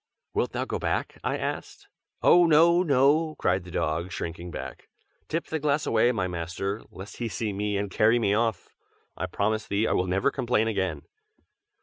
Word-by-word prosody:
"Wilt - - -1
thou - - -1
go - - -3
back?" - - -2
I - - 0
asked. - - -5 0.4
"Oh, 175 -1 +6
no, 170 +3 +5
no!" 155 +1 +3
cried 90 0 0
the - - -10
dog, 85 +2 -2
shrinking 85 0 -5
back. - - -8 0.4
"Tip 165 +2 -2
the 160 - -3
glass 150 0 +1
away, 120 - +3
my 95 -6 -1
master, 90 +4 -4
lest 95 +3 -10
he 120 - -2
see 110 -1 -3
me 105 +1 -1
and 100 -1 -3
carry 110 +4 +4
me 105 -4 +1
off! 110 -3 0 0.5
I 90 - -3
promise 110 +4 -1
thee 100 +2 +1
I - - 0
will 90 - +1
never 95 +9 +1
complain 120 -4 +1
again!" 95 -6 -2
105 Hz, 185 wpm, -26 LUFS, 95-135 Hz, 0.5 s, Oh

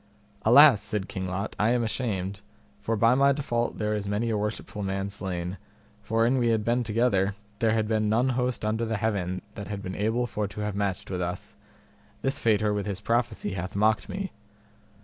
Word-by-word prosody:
Alas, 125 -1 +8
said 105 -3 -2
King 95 -1 -4
Lot, 95 +3 -3
I 105 - +3
am 120 -1 +1
ashamed, 100 -4 -2 0.4
for 115 - -1
by 115 +3 +4
my 140 +2 +5
default 120 -4 -1
there 105 0 0
is 105 -1 -2
many 110 +3 0
a - - +1
worshipful 105 0 -4
man 95 0 -2
slain, 90 -2 -4 0.4
for 115 +2 +1
an 130 +2 +2
we 120 - +2
had 110 -2 +1
been 120 +1 +2
together 105 -4 +1 0.2
there 110 -1 +3
had 110 -1 +1
been 110 -1 +1
none 120 +4 +3
host 125 -3 -1
under 110 +2 0
the 110 -1 -1
heaven 95 -4 -1
that 100 -2 -7
had 100 -1 -5
been 95 - -4
able 110 +5 0
for 105 -3 -2
to 100 +2 -7
have 105 -1 -2
matched 100 -2 -2
with 90 -1 -2
us; 90 +1 -4 0.7
this 135 0 0
faiter 105 -2 +2
with 105 0 -2
his 100 -2 -2
prophecy 115 -1 -1
hath 95 0 -5
mocked 110 +2 +2
me. 195 -1 -4
105 Hz, 200 wpm, -27 LUFS, 100-115 Hz, 0.7 s, Alas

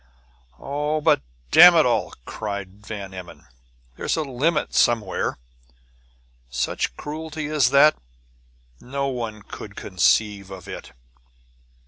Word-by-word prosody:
"Oh, 150 +2 -2
but 150 - +3 0.3
damn 175 +1 +9
it 160 - +5
all!" 125 - 0
cried 100 -1 -6
Van 100 -3 -6
Emmon. 90 -2 -10 0.5
"There's - - -2
a 160 - 0
limit 150 +4 -1
somewhere! 110 -5 +1 1.1
Such 60 -1 -2
cruelty 155 0 -6
as 145 -4 +2
that 140 +3 +6 0.8
no 140 +2 -3
one 115 -5 -5
could - - -10
conceive 100 +1 +1
of 95 -3 -10
it!" - - -9
125 Hz, 110 wpm, -23 LUFS, 100-150 Hz, 1.1 s, damn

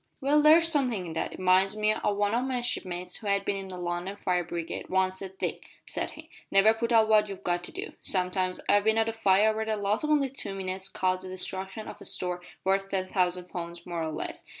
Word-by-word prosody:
"Well, 295 +2 +3
there's 320 +2 +7
somethin' 255 - +1
in 165 - -6
that. 160 - -2
It - - -9
minds 185 +2 +4
me 215 0 +3
o' - - -5
what 200 - -1
one 205 +1 +1
o' 240 - +2
my 255 -1 -1
shipmates, 180 -6 -2
who 215 - -8
had 200 0 +1
bin 200 - 0
in 195 -1 -5
the 185 -1 -7
London 175 +2 -3
fire 180 -3 0
brigade, 170 -1 -5
once 190 0 +1
said. 190 -1 -8
`Dick,' - - -3 0.2
said - - -2
he, - - -11 0.2
`never 205 +3 +6
putt 235 +1 -2
off 225 -2 +5
what 210 -1 +4
you've 195 - -8
got 175 0 0
to - - -9
do. - - -6
Sometimes 185 0 0
I've 205 0 +4
bin 220 0 +3
at 225 0 +3
a - - -3
fire 215 0 +3
where 220 - -1
the 220 -1 -1
loss 205 +4 0
of 300 - -1
only 290 -3 +3
two 205 -7 -5
minutes 190 0 -3
caused 185 0 0
the 185 - -7
destruction 190 +3 -4
of - - -9
a - - -8
store 180 -1 -2 0.2
worth 195 +1 +1
ten 185 -1 -2
thousand 180 -1 0
pound, 170 -1 -6
more 175 -2 -3
or 160 -1 -2
less. 155 - -5
195 Hz, 250 wpm, -28 LUFS, 185-220 Hz, 0.2 s, there's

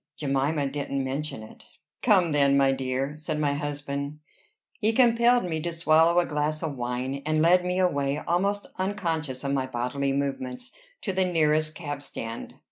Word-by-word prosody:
Jemima 140 +1 0
didn't 140 0 -2
mention 135 -3 -4
it." 110 - -14 0.4
"Come 190 -8 +4
then, 140 -1 +4
my 135 -1 +4
dear," 135 +1 -2
said 155 0 -3
my 145 -2 +1
husband. 145 0 -4 0.6
He 220 +1 +2
compelled 240 0 +4
me 160 -3 -2
to 170 +2 -2
swallow 165 +1 +4
a 175 - +2
glass 150 +1 -1
of 155 -3 -2
wine, 125 +2 -3
and 155 +1 +1
led 180 +2 +5
me 180 0 -1
away, 145 -6 +1
almost 195 +6 0
unconscious 165 -9 -2
of 140 0 -1
my 130 -1 0
bodily 130 +3 -1
movements, 135 - -3 0.3
to 195 - -2
the 190 0 +2
nearest 155 -3 +2
cab 145 -4 -5
stand. 115 -4 -7
150 Hz, 165 wpm, -26 LUFS, 140-170 Hz, 0.6 s, led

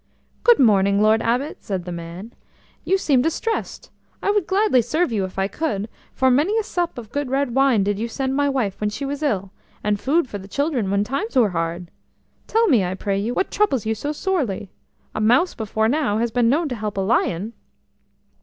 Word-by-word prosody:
"Good 475 -2 +6
morning, 200 -4 +4
Lord 215 +1 +4
Abbot," 250 +6 -1
said 190 -4 -3
the 180 - -5
man. 170 +6 -8 0.5
"You 385 - +2
seem 280 -9 +2
distressed. 330 - -3 0.3
I 405 - +2
would 410 -4 0
gladly 390 - +3
serve 285 +6 0
you 205 -4 0
if 185 - -10
I 195 0 +1
could, 215 -6 -2 0.2
for 260 -1 +2
many 315 - +2
a 445 - +1
sup 350 - -2
of 230 -2 -8
good 285 -2 -2
red 270 -2 0
wine 265 -5 +3
did 205 0 -1
you 230 - -1
send 265 +3 -2
my 285 0 +2
wife 215 -8 -2
when 210 - +1
she 215 +7 -5
was 285 +1 -4
ill, 200 -10 -1 0.3
and 205 -1 0
food 280 +7 +1
for 205 - -6
the 195 - -11
children 275 -3 -1
when 200 +1 +2
times 275 - -3
were 240 -5 +5
hard. 170 0 -3 0.6
Tell 455 +1 +3
me, 245 - +4
I 180 +1 -2
pray 195 0 -1
you, 230 +5 -2
what 385 - 0
troubles 275 - +1
you 220 - +1
so 285 +7 -3
sorely? 285 - -2 0.4
A - - -3
mouse 245 +11 +3
before 220 0 -1
now 255 -5 +1
has 235 +1 0
been 235 0 +2
known 310 +5 +2
to 250 - -3
help 210 -2 -4
a - - +1
lion." 200 0 0
235 Hz, 210 wpm, -22 LUFS, 205-290 Hz, 0.6 s, Good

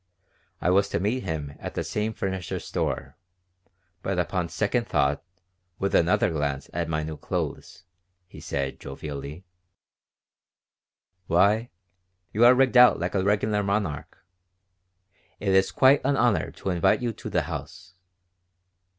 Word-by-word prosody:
I 90 - +2
was 100 +2 +3
to - - -1
meet 110 +7 0
him 75 -4 -4
at - - -7
the - - -1
same 105 +1 -2
furniture 95 -4 -4
store; - - -3 0.8
but 95 0 -2
upon 90 0 -1
second 110 +8 -1
thought, 70 +1 +1
and 90 0 -42 0.4
with 100 - -2
another 85 0 +3
glance 70 -3 -3
at 85 0 -2
my 80 -1 -1
new 80 0 -5
clothes, - - -5 0.4
he 90 - -13
said, 70 -1 -3
jovially: 70 +4 -7 1.8
"Why, 105 +7 +3 0.6
you 110 - +3
are 125 +1 +8
rigged 130 0 +3
out 125 0 +7
like - - -2
a 95 -2 +1
regular 105 +1 +1
monarch! 100 -7 -2 1.2
It 100 - -2
is 95 0 +3
quite 135 +2 +5
an 140 +1 +1
honor 120 -4 +2
to 95 - -4
invite 90 +6 +2
you 120 -2 -1
to - - -8
the - - +1
house. 90 - -8
95 Hz, 140 wpm, -26 LUFS, 80-105 Hz, 1.8 s, are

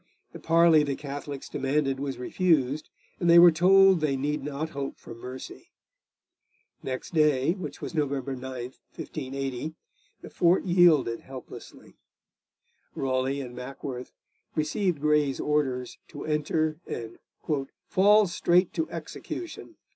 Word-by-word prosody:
The - - -9
parley 165 -1 +5
the 140 -2 -1
Catholics 145 -1 -7
demanded 135 -1 -1
was 140 -1 -3
refused, 150 0 +1 0.3
and 175 - +1
they 170 - +8
were 175 0 +9
told 190 +2 +5
they 140 -3 +1
need 145 +2 -1
not 150 +3 -4
hope 140 -1 -5
for - - -11
mercy. 125 +3 -9 1.1
Next 130 +5 -5
day, 150 -3 +3
which 180 -5 -6
was - - -5
November 140 -3 -1
9, 125 - -10 0.5
1580, 135 +1 -5 0.5
the - - -8
fort 175 +2 +3
yielded 170 -10 +4
helplessly. 130 -1 -12 1.0
Raleigh 135 +1 -1
and 125 -2 -8
Mackworth 125 0 -7 0.4
received 160 +1 0
Grey's 150 -2 +2
orders 135 -4 -1
to - - -8
enter 155 +1 0
and 115 -1 -6 0.7
'fall 210 +3 +5
straight 175 0 +2
to 325 - -2
execution.' 350 - -7
150 Hz, 125 wpm, -27 LUFS, 135-170 Hz, 1.1 s, were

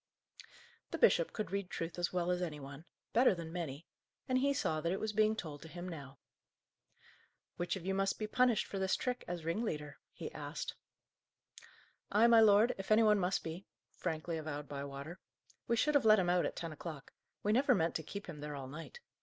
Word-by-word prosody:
The - - -3
bishop - - +4
could 215 - -4
read 200 -2 -2
truth 165 0 -4
as 175 - 0
well 180 -1 0
as 180 0 0
any 155 -4 -3
one 140 +3 -9 0.3
better 240 -3 +5
than 165 -1 -7
many 165 -3 -4 0.4
and 255 0 +2
he 280 +2 +3
saw 155 - 0
that 170 +2 0
it 190 - -1
was 220 -1 -2
being 215 +1 +3
told 155 -8 -6
to 160 - -9
him 175 +2 -7
now. 140 -6 -8 1.4
"Which 175 +2 -1
of 185 -2 -7
you 190 - 0
must 195 0 +1
be 215 - -2
punished 245 +1 +3
for 195 - -5
this 190 0 +2
trick 250 -1 -2
as 175 -2 -4
ringleader?" 160 -6 -2
he - - -7
asked. - - -5 1.4
"I, 210 +3 +5
my 235 -1 +7
lord, 220 +2 +6
if 195 - -6
any 215 +1 +6
one 210 -1 +5
must 185 +1 0
be," 165 +4 -6 0.2
frankly 165 -1 -3
avowed 150 -2 -5
Bywater. 140 +4 -6 0.5
"We 235 - +2
should 300 +6 +2
have 285 - +4
let 215 0 +8
him 180 -3 +2
out 180 -1 +3
at - - -6
ten 165 -2 -4
o'clock. 155 -2 -8 0.3
We 210 - +2
never 255 +1 +4
meant 165 -3 +1
to - - -2
keep 200 +6 -7
him 160 -4 -8
there 150 0 -5
all 135 -2 -6
night. 165 - -9
180 Hz, 205 wpm, -35 LUFS, 155-215 Hz, 1.4 s, let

